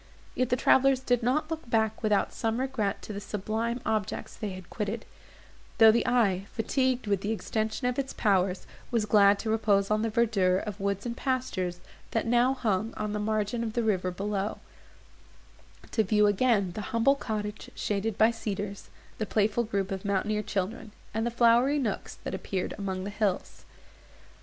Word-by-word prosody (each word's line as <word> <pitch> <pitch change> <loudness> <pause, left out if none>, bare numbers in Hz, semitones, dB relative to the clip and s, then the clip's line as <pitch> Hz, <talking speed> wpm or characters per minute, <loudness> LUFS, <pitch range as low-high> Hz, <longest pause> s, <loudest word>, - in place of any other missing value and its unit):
Yet 255 -1 0
the - - +3
travellers 265 +1 +4
did 245 -2 +1
not 300 +7 0
look 320 -6 -5
back 220 -1 +1
without 210 -3 +1
some 225 +1 -1
regret 255 -7 -1
to 215 - -6
the 200 - -4
sublime 220 +4 -2
objects 215 -3 -2
they 215 -3 -4
had 185 -2 -9
quitted; 215 +1 -3 0.7
though 220 -1 +9
the 235 +3 +1
eye, 200 -6 +2
fatigued 255 +2 0
with 200 -2 0
the 205 - -2
extension 220 +2 -2
of 250 +1 0
its 270 -1 -2
powers, 190 -3 +1 0.2
was 230 -3 +1
glad 205 -1 +5
to 220 +2 -2
repose 205 -2 +2
on 215 0 +2
the 225 - 0
verdure 210 -5 +2
of 210 +1 -5
woods 200 +1 -2
and 235 -1 -3
pastures, 225 -10 -2 0.3
that 225 - -1
now 245 +3 +3
hung 220 -3 -1
on 210 -1 -2
the 210 - -1
margin 215 +2 -1
of 220 -2 -3
the 235 - 0
river 190 -4 +1
below; 200 +2 -2 1.3
to 220 - +2
view 210 +1 +3
again 205 -2 +2
the 210 - -5
humble 230 +4 +4
cottage 215 -5 -4
shaded 210 0 -2
by 220 +2 +5
cedars, 205 -3 -5 0.3
the 215 - -1
playful 215 +2 +1
group 200 -3 -2
of 190 -1 -3
mountaineer 210 +1 0
children, 210 +2 -3 0.2
and 225 +2 0
the - - +1
flowery 240 +4 +4
nooks 235 -8 -2
that - - -4
appeared 190 0 -3
among 190 -2 -3
the 200 - -4
hills. 205 -3 -2
215 Hz, 175 wpm, -28 LUFS, 200-235 Hz, 1.3 s, though